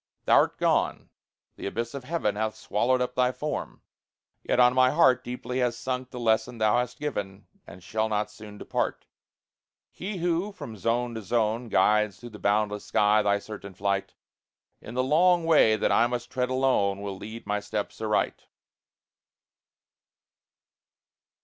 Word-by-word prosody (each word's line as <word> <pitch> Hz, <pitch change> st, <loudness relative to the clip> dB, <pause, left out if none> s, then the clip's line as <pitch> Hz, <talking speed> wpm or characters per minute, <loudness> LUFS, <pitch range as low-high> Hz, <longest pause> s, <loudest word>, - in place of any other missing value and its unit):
Thou'rt -, -, +4 dB
gone, -, -, 0 dB, 0.5 s
the -, -, -5 dB
abyss 115 Hz, +3 st, -3 dB
of 140 Hz, -2 st, -7 dB
heaven 130 Hz, -9 st, -1 dB
Hath 110 Hz, +1 st, -2 dB
swallowed 125 Hz, +4 st, 0 dB
up 125 Hz, 0 st, -1 dB
thy 125 Hz, 0 st, +2 dB
form; 150 Hz, +3 st, -5 dB, 0.6 s
yet -, -, 0 dB
on 125 Hz, 0 st, +6 dB
my 130 Hz, 0 st, +5 dB
heart 130 Hz, -4 st, +4 dB
Deeply 125 Hz, +1 st, -4 dB
has 120 Hz, -2 st, 0 dB
sunk 130 Hz, 0 st, -3 dB
the 125 Hz, -, -8 dB
lesson 115 Hz, +1 st, +1 dB
thou 110 Hz, +1 st, +3 dB
hast 125 Hz, 0 st, -3 dB
given, 105 Hz, -9 st, -4 dB, 0.2 s
And 90 Hz, +1 st, -12 dB
shall 110 Hz, +3 st, -1 dB
not 105 Hz, 0 st, -1 dB
soon 105 Hz, -1 st, -11 dB
depart. -, -, -3 dB, 0.9 s
He 195 Hz, +1 st, -5 dB
who, 175 Hz, +4 st, -1 dB
from 145 Hz, -, -8 dB
zone 115 Hz, +4 st, -1 dB
to 110 Hz, -, -5 dB
zone, 115 Hz, +2 st, 0 dB
Guides 105 Hz, -4 st, +2 dB
through 120 Hz, -, -10 dB
the 105 Hz, -, -11 dB
boundless 105 Hz, 0 st, 0 dB
sky 105 Hz, +2 st, +3 dB
thy 100 Hz, -1 st, +2 dB
certain 100 Hz, -2 st, -9 dB
flight, 100 Hz, 0 st, -2 dB, 0.7 s
In 115 Hz, -, -9 dB
the 130 Hz, -, +1 dB
long 170 Hz, +5 st, +3 dB
way 150 Hz, -9 st, +5 dB
that -, -, 0 dB
I 120 Hz, -, +4 dB
must 120 Hz, 0 st, -4 dB
tread 125 Hz, -1 st, -1 dB
alone, 130 Hz, -7 st, +1 dB
Will 100 Hz, -1 st, -4 dB
lead 110 Hz, +4 st, -9 dB
my 105 Hz, 0 st, -1 dB
steps 105 Hz, +1 st, -5 dB
aright. 105 Hz, -1 st, -1 dB
115 Hz, 155 wpm, -27 LUFS, 105-130 Hz, 0.9 s, on